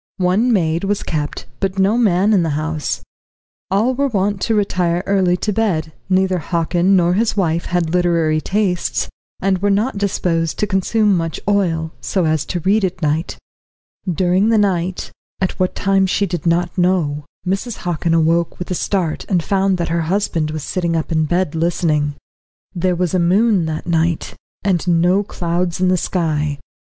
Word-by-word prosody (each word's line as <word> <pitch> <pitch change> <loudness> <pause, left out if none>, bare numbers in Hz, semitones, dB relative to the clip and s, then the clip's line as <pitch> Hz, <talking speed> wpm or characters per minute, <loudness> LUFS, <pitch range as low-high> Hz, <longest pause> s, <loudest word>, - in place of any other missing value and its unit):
One 195 +7 +2
maid 170 -5 +1
was 200 +1 -1
kept, 150 -2 -3
but 195 0 -2
no 195 +3 +3
man 210 -3 +3
in 195 - +4
the 155 -3 -1
house. 155 -1 -3 0.7
All 215 +7 +2
were 280 +2 +1
wont 200 -4 -1
to 225 - +1
retire 180 -4 0
early 185 -3 +2
to 210 +3 -1
bed; 170 -8 0 0.2
neither 185 -1 +2
Hockin 170 +3 +1
nor 175 -1 +3
his 215 +2 0
wife 170 -3 0
had 175 -2 -1
literary 170 -3 +2
tastes, 195 -3 -1 0.3
and 190 -1 +1
were 205 +2 +1
not 205 +3 0
disposed 170 -5 0
to - - +1
consume 205 +1 +2
much 165 -2 -2
oil, 170 -6 +1
so 185 -4 0
as 155 -1 +1
to 175 - -3
read 200 +5 +2
at 180 -2 -2
night. 155 +3 -1 0.7
During 185 +5 +2
the 225 - +4
night, 185 -3 0 0.3
at 190 - -2
what 185 0 0
time 195 -1 +2
she 200 +2 +1
did 175 -3 -3
not 170 +1 +1
know, 170 -5 +1 0.2
Mrs. 195 +5 -2
Hockin 170 -1 0
awoke 165 +1 +1
with 180 - -6
a - - +2
start, 180 -3 -1
and 180 -5 +1
found 195 -1 +1
that 170 - -2
her 170 +1 0
husband 165 -2 0
was 155 -1 -4
sitting 170 -1 -1
up 160 +1 -2
in 160 -1 +2
bed 175 0 0
listening. 160 -3 0 0.6
There 180 0 0
was 180 0 -1
a 185 - +2
moon 190 +2 +3
that 155 -1 -4
night, 165 -1 0 0.3
and 185 -3 0
no 175 +3 +3
clouds 175 -2 -2
in 185 0 +2
the 185 - +3
sky. 150 -5 -1
180 Hz, 175 wpm, -18 LUFS, 165-195 Hz, 0.7 s, in